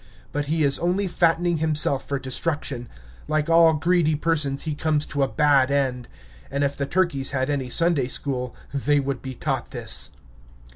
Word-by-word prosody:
But 145 Hz, -1 st, -3 dB
he 160 Hz, +1 st, +1 dB
is 140 Hz, -1 st, +3 dB
only 180 Hz, +4 st, 0 dB
fattening 175 Hz, -1 st, +1 dB
himself 150 Hz, -3 st, +1 dB
for 140 Hz, -, -1 dB
destruction; 135 Hz, -2 st, -3 dB, 0.4 s
like 155 Hz, +1 st, 0 dB
all 165 Hz, -1 st, +6 dB
greedy 160 Hz, 0 st, +2 dB
persons, 150 Hz, -3 st, 0 dB
he 155 Hz, -, -3 dB
comes 150 Hz, 0 st, 0 dB
to 140 Hz, -, -3 dB
a 135 Hz, -, +3 dB
bad 140 Hz, -2 st, +3 dB
end. 130 Hz, -3 st, -1 dB, 0.4 s
And 140 Hz, +2 st, -1 dB
if 140 Hz, 0 st, 0 dB
the 140 Hz, 0 st, -3 dB
turkeys 165 Hz, -6 st, +1 dB
had 130 Hz, +2 st, 0 dB
any 135 Hz, -3 st, -2 dB
Sunday 165 Hz, -3 st, +2 dB
school, 125 Hz, -2 st, -2 dB, 0.2 s
they 145 Hz, +1 st, +2 dB
would 135 Hz, -2 st, -3 dB
be 130 Hz, -1 st, -7 dB
taught -, -, -3 dB
this. -, -, -1 dB
145 Hz, 175 wpm, -23 LUFS, 135-160 Hz, 0.4 s, all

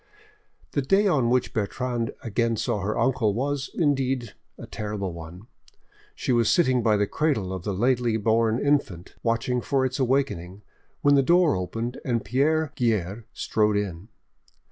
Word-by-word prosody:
The 140 Hz, -, 0 dB
day 195 Hz, +10 st, +3 dB
on 135 Hz, -11 st, +2 dB
which 125 Hz, 0 st, +1 dB
Bertrande 115 Hz, +2 st, -2 dB
again 115 Hz, +1 st, 0 dB
saw 105 Hz, -1 st, -1 dB
her 100 Hz, +3 st, -2 dB
uncle 125 Hz, -6 st, +1 dB
was, 135 Hz, +2 st, -2 dB
indeed, 135 Hz, -, 0 dB, 0.2 s
a -, -, -9 dB
terrible 105 Hz, -4 st, -4 dB
one. 85 Hz, +4 st, -10 dB, 0.7 s
She -, -, -2 dB
was 120 Hz, -2 st, +3 dB
sitting 130 Hz, -9 st, +3 dB
by 110 Hz, -2 st, +3 dB
the 105 Hz, -, +2 dB
cradle 110 Hz, -8 st, -1 dB
of 95 Hz, -2 st, -6 dB
the 105 Hz, -, -1 dB
lately 120 Hz, +2 st, +1 dB
born 110 Hz, +1 st, +2 dB
infant, 135 Hz, -, -1 dB
watching 115 Hz, +2 st, 0 dB
for 135 Hz, 0 st, +1 dB
its 130 Hz, +2 st, -3 dB
awakening, 120 Hz, -8 st, -1 dB, 0.4 s
when 145 Hz, -, +4 dB
the 140 Hz, -, +5 dB
door 170 Hz, +2 st, +4 dB
opened, 115 Hz, +7 st, -4 dB
and 120 Hz, -4 st, -1 dB
Pierre 145 Hz, +7 st, +1 dB
Guerre 110 Hz, -2 st, -1 dB
strode 105 Hz, -1 st, +1 dB
in. 95 Hz, -2 st, -4 dB
120 Hz, 155 wpm, -25 LUFS, 105-135 Hz, 0.7 s, the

